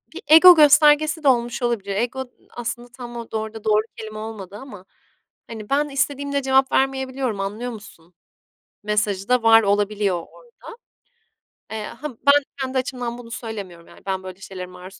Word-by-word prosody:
bir 355 - -7
ego 325 +4 +9
göstergesi 305 +1 +5
de - - +1
olmuş 240 -1 +1
olabilir. 215 -5 -2
Ego 245 +5 -2 0.3
aslında 240 0 -6
tam 240 -1 -8
orada 220 -2 -5
da - - -24
doğru 215 0 +3 0.2
kelime 215 -1 -8
olmadı 215 -3 -8
ama. 210 -6 -12 0.6
Hani, 220 -2 -9
"Ben 290 +2 +1
istediğimde 280 0 -1
cevap 265 0 +2
vermeyebiliyorum 265 -4 -1
anlıyor 210 +5 -4
musun?" 180 -6 -13 0.7
mesajı 205 -1 -1
da 250 -2 +3
var 225 0 +6
olabiliyor 205 -1 +1
orada. 480 - -13 1.2
Eee, 220 -1 -4
ha, 300 - -7
ben 280 +3 +3 0.2
kendi 265 0 -2
açımdan 245 -2 -3
bunu 235 -1 -12
söylemiyorum 200 -8 -8
yani - - -17
ben 190 -1 -3
böyle 185 0 -9
şeylere 190 -1 -7
maruz 180 +1 -13
235 Hz, 155 wpm, -22 LUFS, 205-265 Hz, 1.2 s, ego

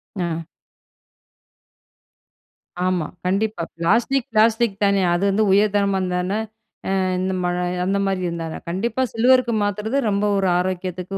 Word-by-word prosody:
அ. 165 -3 -3 2.4
ஆமா. 180 -4 0 0.2
கண்டிப்பா. 195 -1 0
Plastic, 235 +9 +1
plastic 225 0 +3
தான. 200 -1 +3
அது 175 +3 0
வந்து 205 +2 +2
உயர் 205 +1 +4
தரமா 200 -1 +2
இருந்தா 180 -1 -1
என்ன? 195 +3 -1 0.6
அ - - +1 0.2
இந்த 190 +1 -1
மல 175 0 0 0.3
அந்த 200 +1 0
மாரி 190 -1 -1
இருந்தா 170 -1 -4
என்ன? - - -7
கண்டிப்பா 225 +8 -1
சில்வருக்கு 245 0 +3
மாத்துறது, 220 +6 -1
ரொம்ப 200 +1 0
ஒரு 190 -2 +1
ஆரோக்கியத்துக்கு 185 +1 -3
195 Hz, 135 wpm, -21 LUFS, 185-220 Hz, 2.4 s, உயர்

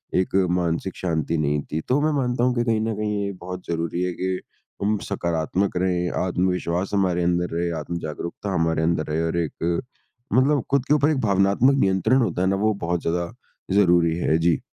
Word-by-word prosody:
एक 95 +1 +1 0.2
मानसिक 90 +1 -1
शांति 85 -2 -1
नहीं 75 -1 0
थी। 80 +1 -1
तो 135 +3 +3
मैं 155 +1 +2
मानता 125 -3 0
हूँ 125 - +2
कि 120 - +1
कहीं 110 -2 +1
न 110 0 -1
कहीं 105 -1 -1
ये 100 - -2
बहुत 90 0 -7
ज़रूरी 85 +1 -2
है 90 -1 -1
कि 95 0 -2 0.4
हम 105 +1 +2
सकारात्मक 90 +1 -1
रहे, 90 -1 +1
आत्मविश्वास 90 0 -1
हमारे 90 -3 +1
अंदर 90 0 +1
रहे, 85 0 0
आत्म-जागरूकता 85 +4 -5
हमारे 80 -1 +1
अंदर 80 -1 +1
रहे 80 +2 -1
और 85 - -2
एक 85 +1 -1 0.5
मतलब 135 +1 +3
खुद 140 -2 +2
के 150 - +2
ऊपर 150 +1 +3
एक 150 - +1
भावनात्मक 100 +6 +3
नियंत्रण 95 +6 +3
होता 100 -5 0
है 95 - +2
ना 95 - +2
वो 110 - +3
बहुत 85 0 0
ज़्यादा 85 +5 -2 0.4
ज़रूरी 85 -4 +4
है 80 -2 +2
जी। 85 0 +2
90 Hz, 190 wpm, -23 LUFS, 85-105 Hz, 0.5 s, ज़रूरी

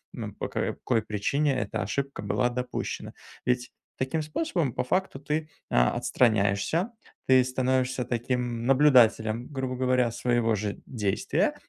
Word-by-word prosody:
н - - -5
по - - -4
какой 115 -3 -1
причине 130 +8 0
эта 110 -3 -2
ошибка 135 +7 -3
была 120 +4 +1
допущена?". 125 +1 -4 0.3
Ведь 125 0 0 0.3
таким 130 +5 -1
способом 155 - -1
по - - -1
факту 185 +1 -1
ты, 150 +2 -2 0.2
а, - - +4
отстраняешься. 110 - +1 0.4
Ты 130 -1 +6
становишься 130 0 0
таким 120 -1 -2
наблюдателем, 125 -4 +4
грубо 130 -3 -3
говоря, 125 -2 +2
своего 120 -1 +1
же 105 0 -4
действия, 105 -6 0
125 Hz, 130 wpm, -27 LUFS, 115-135 Hz, 0.4 s, Ты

